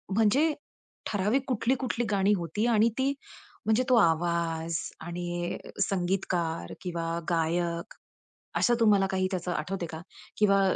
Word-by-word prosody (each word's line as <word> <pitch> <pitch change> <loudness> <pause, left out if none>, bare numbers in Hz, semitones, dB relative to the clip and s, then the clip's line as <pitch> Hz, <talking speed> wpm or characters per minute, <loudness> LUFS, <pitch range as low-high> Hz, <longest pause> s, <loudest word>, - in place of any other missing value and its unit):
म्हणजे 260 +9 +4 0.6
ठराविक 210 +6 +1
कुठली, 245 0 +1
कुठली 245 -2 -2
गाणी 200 0 +3
होती? 175 +6 -2
आणि 225 -1 +4
ती 270 +1 +2 0.5
म्हणजे 220 +3 +3
तो 255 - +6
आवाज 165 -2 +1 0.2
आणि 175 +1 -3 0.3
संगीतकार 180 -3 -1
किंवा 170 -2 -2
गायक, 170 0 0 0.7
असं 240 - +4
तुम्हाला 205 -4 +4
काही 185 0 +1
त्याचं 180 -1 -2
आठवत 175 +4 -2
आहे - - -2
का? 160 0 -6 0.4
किंवा 200 -2 +4
185 Hz, 130 wpm, -28 LUFS, 170-215 Hz, 0.7 s, तो